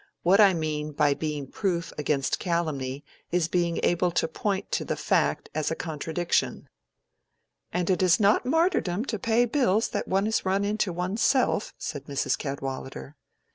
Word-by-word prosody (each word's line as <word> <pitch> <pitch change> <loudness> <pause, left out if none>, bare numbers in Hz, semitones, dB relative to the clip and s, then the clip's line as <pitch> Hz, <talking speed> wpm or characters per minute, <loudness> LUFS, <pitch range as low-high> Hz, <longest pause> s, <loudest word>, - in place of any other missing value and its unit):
"What 190 +4 +5
I 200 -3 +7
mean 155 -2 -3
by 145 0 +3
being 150 -1 -3
proof 170 +3 -2
against 145 -2 0
calumny 145 -6 -2 0.3
is 175 -2 +2
being 170 -1 0
able 175 +1 +2
to 170 - 0
point 195 +4 -3
to - - 0
the - - -2
fact - - 0
as 155 0 -1
a 165 - -2
contradiction." 165 +1 -2 1.0
"And 180 -1 -1
it 185 -1 +2
is 185 +1 +4
not 205 0 +4
martyrdom 265 - +1
to 220 -6 -3
pay 230 +4 +2
bills 230 -4 +1
that - - -3
one 195 +2 +1
has 220 +1 0
run 195 +1 +1
into 210 -2 0
one's 180 +5 -2
self," 260 -5 +2
said 145 - -5
Mrs. 140 -1 0
Cadwallader. 135 0 -6
175 Hz, 165 wpm, -26 LUFS, 150-200 Hz, 1.0 s, I